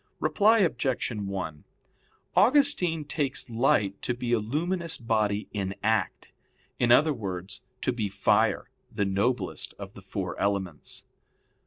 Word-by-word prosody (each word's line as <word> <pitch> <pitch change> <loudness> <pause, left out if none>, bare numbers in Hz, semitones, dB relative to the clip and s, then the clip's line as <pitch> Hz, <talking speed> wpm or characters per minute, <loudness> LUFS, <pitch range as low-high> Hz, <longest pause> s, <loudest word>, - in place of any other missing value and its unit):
Reply 220 +2 +4
Obj. 135 - 0
1: 95 -8 -4 0.7
Augustine 200 - +3
takes 140 -4 -2
light 105 -4 +1
to 120 - -2
be 120 0 -2
a 120 - +4
luminous 165 - -1
body 110 -3 0
in 100 -2 -2
act 110 +1 0 0.5
in 120 -1 +3
other 150 +5 +6
words, 95 -3 -5 0.2
to 130 - +1
be 110 -4 -2
fire, 100 0 +1 0.2
the 100 - -1
noblest 100 +6 -1
of - - -9
the - - -12
four - - -4
elements. 95 -6 -2
120 Hz, 130 wpm, -27 LUFS, 100-150 Hz, 0.7 s, other